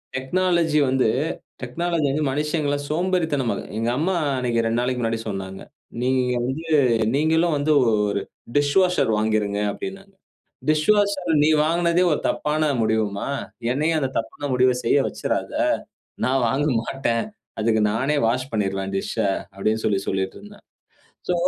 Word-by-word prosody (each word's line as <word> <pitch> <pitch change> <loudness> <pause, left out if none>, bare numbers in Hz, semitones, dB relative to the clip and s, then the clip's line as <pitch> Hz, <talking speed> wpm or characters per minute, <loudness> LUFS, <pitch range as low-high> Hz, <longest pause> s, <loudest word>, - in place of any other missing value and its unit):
Technology 165 +2 +1
வந்து, 130 -2 +2 0.5
technology 160 +4 -1
வந்து 150 +2 0
மனுஷங்கள 150 0 0
சோம்பேறித்தனமா 160 -6 0 0.2
எங்க 115 +1 0
அம்மா 180 +5 0 0.2
அன்னக்கி 120 -2 0
2 115 +1 +1
நாளைக்கு 125 0 -1
முன்னாடி 115 0 -1
சொன்னாங்க, 95 -2 -5 0.4
"நீ 125 - +1 0.4
வந்து 145 +6 -4 0.5
நீங்களும் 160 +2 +2
வந்து 145 +2 +1 0.2
ஒரு 105 -2 +1 0.4
டிஷ்வாஷர் 160 0 +3
வாங்கிருங்க" 105 -1 0
அப்பிடின்னு. 195 - -8 0.5
டிஷ்வாஷர் 190 +3 +2
நீ - - +4 0.2
வாங்கினதே 170 +2 +2
ஒரு 150 - +1
தப்பான 155 0 0
முடிவுமா! 110 -2 0 0.4
என்னையும் 155 +5 +1
அந்த 135 -3 -1
தப்பான 145 +5 -5
முடிவ 125 0 +4
செய்ய 115 - +3
வச்சுறாத! - - -3 0.7
நான் 130 +1 +2
வாங்க 140 +5 +1 0.2
மாட்டேன் 115 -3 -1 0.4
அதுக்கு 110 0 +2
நானே 135 +7 0
வாஷ் 125 +3 -1
பண்ணிருவேன் 95 -2 -2
டிஷ்ஷா. 100 +2 -1 0.3
அப்பிடின்னு 110 +3 -1
சொல்லி 100 -2 +2
சொல்லிட்டுருந்தேன். 150 - -4 0.7
சோ, 180 - +2
135 Hz, 125 wpm, -23 LUFS, 115-160 Hz, 0.7 s, நீ